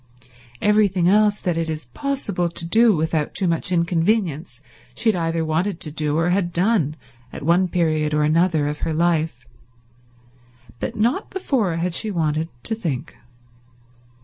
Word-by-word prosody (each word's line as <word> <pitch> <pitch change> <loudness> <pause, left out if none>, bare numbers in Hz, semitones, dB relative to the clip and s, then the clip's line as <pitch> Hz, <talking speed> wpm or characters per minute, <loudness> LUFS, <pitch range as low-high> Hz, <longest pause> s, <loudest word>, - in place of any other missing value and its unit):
Everything 205 -4 +3
else 210 +1 +3
that 175 -3 -1
it 165 -1 -2
is 155 -3 -4
possible 210 -11 -2
to 170 0 -3
do 220 +4 +4
without 160 -1 -1
too 190 - +2
much 170 +2 -1
inconvenience 170 - 0 0.4
she 225 - +1
had - - -5
either 165 -1 -1
wanted 165 +4 -1
to 155 - -3
do 150 0 -1
or 165 +2 +1
had 180 -2 0
done 175 -4 +1 0.4
at - - -8
one 175 +4 +3
period 155 -4 0
or 150 0 +1
another 160 -1 +2
of 150 0 -4
her 160 - -2
life, 160 -7 0 1.3
but - - -4
not 240 - 0
before 245 - -1
had 170 +1 -2
she 215 +5 +2
wanted 160 -3 -1
to 225 - -2
think. 165 - -4
170 Hz, 155 wpm, -21 LUFS, 155-200 Hz, 1.3 s, do